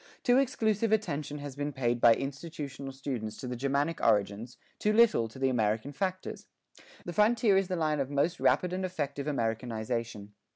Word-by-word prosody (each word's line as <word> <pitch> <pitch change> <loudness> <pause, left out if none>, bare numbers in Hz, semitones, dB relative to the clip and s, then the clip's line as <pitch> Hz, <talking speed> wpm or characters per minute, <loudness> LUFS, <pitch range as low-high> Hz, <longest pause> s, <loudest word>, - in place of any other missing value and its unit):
Too 245 +1 +5
exclusive 225 -5 +1
attention 155 -9 -1
has 145 -2 -7
been 145 +1 -3
paid 120 -3 -1
by 115 -1 +7
institutional 140 -1 -6
students 125 -6 -5
to 130 - -6
the 125 - -3
Germanic 140 +5 -1
origins, 105 +4 +1 0.2
too 210 - +2
little 220 - +4
to 115 - -13
the 135 0 +1
American 110 +2 0
factors. 185 +5 -4 0.6
The 175 - -5
frontier 215 0 +4
is 190 -1 +2
the 185 - -2
line 155 -3 0
of 135 -1 -1
most 145 +5 0
rapid 180 0 +2
and 190 +1 -2
effective 150 -6 -3
Americanization. 115 -4 -3
140 Hz, 170 wpm, -30 LUFS, 120-180 Hz, 0.6 s, by